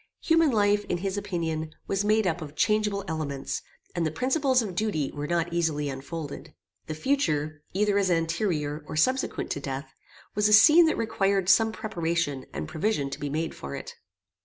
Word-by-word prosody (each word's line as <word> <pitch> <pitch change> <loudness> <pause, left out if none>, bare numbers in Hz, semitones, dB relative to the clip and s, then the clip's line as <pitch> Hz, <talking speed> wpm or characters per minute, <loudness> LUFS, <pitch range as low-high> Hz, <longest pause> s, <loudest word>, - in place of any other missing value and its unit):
Human 325 -1 +4
life, 205 -3 +2
in 175 - -1
his 190 +2 -3
opinion, 160 -5 -3
was 195 0 0
made 215 +1 +3
up 175 -1 0
of 150 -1 -8
changeable 210 +2 +1
elements, 150 -4 -3 0.3
and 175 - -1
the 160 - +1
principles 260 - +1
of 200 -4 -5
duty 175 -8 -1
were 145 0 -5
not 170 0 -1
easily 155 -4 0
unfolded. 140 +3 -7 0.3
The 155 - -4
future, 155 - 0
either 205 0 +2
as 195 -2 +1
anterior, 165 -3 0
or - - -6
subsequent 255 +12 0
to - - -2
death, 135 0 -5 0.4
was 210 0 +2
a 210 - +3
scene 315 +10 +8
that 315 - +1
required 195 -4 +1
some 225 +2 +5
preparation 170 - -2
and 75 +2 -5
provision 155 - -1
to - - -6
be 145 - -3
made 160 +3 -2
for 70 0 -7
it. - - -7
170 Hz, 180 wpm, -27 LUFS, 150-210 Hz, 0.4 s, scene